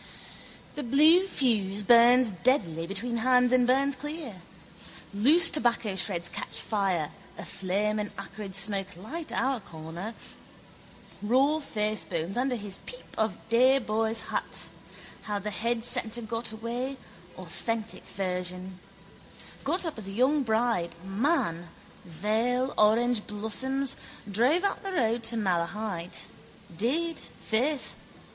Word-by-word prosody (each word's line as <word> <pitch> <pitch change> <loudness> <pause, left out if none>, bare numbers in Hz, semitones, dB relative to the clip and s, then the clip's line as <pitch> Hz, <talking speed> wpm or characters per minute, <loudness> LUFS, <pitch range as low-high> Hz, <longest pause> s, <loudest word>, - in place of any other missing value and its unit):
The 295 - -4
blue 310 +9 +5
fuse 210 - +1
burns 240 +2 +6
deadly 175 - +1
between 230 +5 -1
hands 250 +1 +4
and 250 -1 +4
burns 270 +2 +3
clear. 285 - -6 0.7
Loose 295 +12 +5
tobaccoshreds 195 - 0
catch - - -2
fire: 190 -8 -1 0.3
a - - -7
flame 200 +3 -1
and 210 0 -2
acrid 200 0 -6
smoke 195 -2 0
light 305 - -6
our 265 -1 0
corner. 170 +4 -8 1.1
Raw 265 +8 +3
facebones 210 - -2
under 255 +1 0
his 205 -4 -4
peep - - -9
of 220 0 0
day 255 +4 +5
boy's 225 -2 0
hat. - - -4 0.6
How 205 - 0
the 210 +1 -4
head 230 +2 -1
centre 235 -1 +3
got 230 +1 -4
away, 240 +4 -4 0.4
authentic 225 -1 -4
version. 180 -1 -3 0.8
Got 350 +6 0
up 320 -8 -4
as 200 - -5
a - - -5
young 265 +7 +3
bride, 220 -8 0
man, 195 - 0 0.4
veil, 220 +9 0
orangeblossoms, 230 +4 +1 0.3
drove 255 - +3
out 400 - 0
the 390 -1 -5
road 235 -6 +1
to 230 +1 +2
Malahide. 180 -1 -2 0.6
Did, 315 - 0
faith. 260 +5 -1
225 Hz, 120 wpm, -28 LUFS, 195-255 Hz, 1.1 s, burns